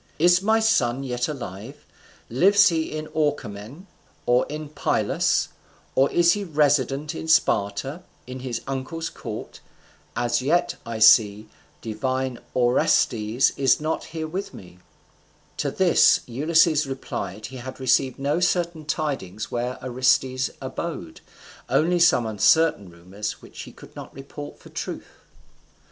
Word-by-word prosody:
is 175 Hz, +3 st, +4 dB
my 220 Hz, +3 st, +3 dB
son 135 Hz, -, +1 dB
yet 125 Hz, -2 st, -2 dB
alive? 120 Hz, -3 st, -8 dB, 0.4 s
lives 200 Hz, -, +5 dB
he 160 Hz, -2 st, -2 dB
in 155 Hz, 0 st, -4 dB
Orchomen, 135 Hz, -, -3 dB, 0.4 s
or 120 Hz, +1 st, +3 dB
in 150 Hz, +1 st, -5 dB
Pylus, 155 Hz, -, 0 dB, 0.4 s
or 135 Hz, +1 st, +3 dB
is 170 Hz, 0 st, +4 dB
he 205 Hz, -, -3 dB
resident 145 Hz, -3 st, +1 dB
in -, -, -6 dB
Sparta, 135 Hz, -, +1 dB, 0.2 s
in 130 Hz, +1 st, -7 dB
his 125 Hz, -2 st, -4 dB
uncle's 135 Hz, +5 st, -4 dB
court? 110 Hz, -2 st, -8 dB, 0.6 s
As 120 Hz, 0 st, 0 dB
yet, 165 Hz, +7 st, +1 dB
I 115 Hz, -1 st, -4 dB
see, 110 Hz, -1 st, +5 dB, 0.3 s
divine 130 Hz, +3 st, -2 dB, 0.2 s
Orestes 120 Hz, -2 st, +2 dB
is 135 Hz, -3 st, +3 dB
not 155 Hz, +1 st, -2 dB
here 160 Hz, -1 st, -5 dB
with 185 Hz, +5 st, -5 dB
me." 90 Hz, -1 st, -13 dB, 0.8 s
To -, -, -1 dB
this -, -, +4 dB
Ulysses 155 Hz, +4 st, +2 dB
replied 130 Hz, -8 st, -5 dB
that 110 Hz, +1 st, -10 dB
he 130 Hz, +4 st, -8 dB
had 130 Hz, +2 st, -8 dB
received 130 Hz, 0 st, +2 dB
no 140 Hz, +4 st, 0 dB
certain 170 Hz, -3 st, 0 dB
tidings 135 Hz, -, -3 dB
where 125 Hz, +1 st, -2 dB
Orestes 130 Hz, +1 st, +1 dB
abode, 130 Hz, -, -6 dB, 0.5 s
only 175 Hz, +3 st, +2 dB
some 165 Hz, -8 st, +4 dB
uncertain 110 Hz, -, +2 dB
rumours 90 Hz, +5 st, -7 dB
which -, -, -10 dB
he -, -, -10 dB
could -, -, -16 dB
not -, -, -9 dB
report 140 Hz, +2 st, -9 dB
for -, -, -16 dB
truth. -, -, -6 dB
130 Hz, 135 wpm, -24 LUFS, 120-155 Hz, 0.8 s, lives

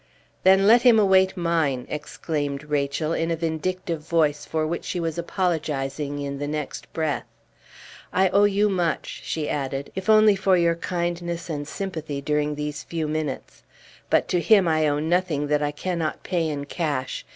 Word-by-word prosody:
"Then 190 Hz, +1 st, +5 dB
let 230 Hz, +3 st, +7 dB
him 240 Hz, -3 st, +6 dB
await 190 Hz, -2 st, +4 dB
mine!" 165 Hz, -7 st, 0 dB
exclaimed 150 Hz, -1 st, -4 dB
Rachel, 150 Hz, +1 st, -1 dB
in 165 Hz, 0 st, -1 dB
a 165 Hz, -, +1 dB
vindictive 165 Hz, +1 st, -2 dB
voice 150 Hz, -2 st, +1 dB
for 160 Hz, -1 st, -1 dB
which 170 Hz, +2 st, -3 dB
she 180 Hz, -, -3 dB
was 165 Hz, 0 st, -2 dB
apologizing 150 Hz, -5 st, -2 dB
in 140 Hz, -1 st, -4 dB
the 145 Hz, -, -3 dB
next 150 Hz, -1 st, -5 dB
breath. 155 Hz, -3 st, -2 dB, 0.8 s
"I 190 Hz, 0 st, +3 dB
owe 200 Hz, +2 st, +4 dB
you 205 Hz, +1 st, +3 dB
much," 175 Hz, -6 st, -1 dB
she 155 Hz, -2 st, -3 dB
added, 135 Hz, -1 st, -3 dB
"if 190 Hz, +2 st, -5 dB
only 215 Hz, -1 st, +6 dB
for 190 Hz, -1 st, +3 dB
your 170 Hz, -1 st, +3 dB
kindness 170 Hz, 0 st, -3 dB
and 145 Hz, -1 st, -4 dB
sympathy 160 Hz, -6 st, -4 dB
during 150 Hz, +1 st, 0 dB
these 150 Hz, 0 st, -4 dB
few 165 Hz, -2 st, -3 dB
minutes. 155 Hz, -1 st, -4 dB, 0.5 s
But -, -, +3 dB
to 180 Hz, -, +1 dB
him 200 Hz, -1 st, +5 dB
I 155 Hz, -1 st, +2 dB
owe 145 Hz, 0 st, +1 dB
nothing 160 Hz, -1 st, 0 dB
that 150 Hz, 0 st, +2 dB
I 145 Hz, -, +1 dB
cannot 165 Hz, +1 st, -3 dB
pay 170 Hz, -4 st, 0 dB
in 145 Hz, -1 st, -4 dB
cash. 145 Hz, -4 st, -3 dB
160 Hz, 170 wpm, -24 LUFS, 150-180 Hz, 0.8 s, let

